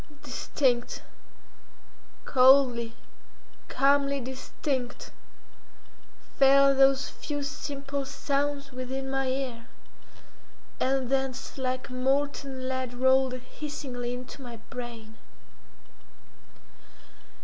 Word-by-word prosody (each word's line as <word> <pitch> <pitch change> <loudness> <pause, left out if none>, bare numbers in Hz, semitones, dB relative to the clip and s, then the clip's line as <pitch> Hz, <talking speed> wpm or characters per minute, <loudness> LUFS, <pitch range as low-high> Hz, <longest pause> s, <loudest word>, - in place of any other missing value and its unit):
Distinct, 245 -3 0 1.2
coldly, 255 -3 +5 0.7
calmly 280 0 +3
distinct, 260 0 -4 1.3
fell 275 0 +7
those 270 0 +4
few 290 -1 -5
simple 280 -1 -4
sounds 280 0 -1
within 265 +1 -4
my 270 0 0
ear, 255 -3 -3 1.1
and 265 -1 +1
thence 270 -1 -1
like 255 -1 -2
molten 270 0 -1
lead 260 -1 -3
rolled 260 +1 +4
hissingly 255 -1 -5
into 250 +3 -9
my 240 -3 -8
brain. 235 -3 -7
265 Hz, 75 wpm, -28 LUFS, 255-275 Hz, 1.3 s, fell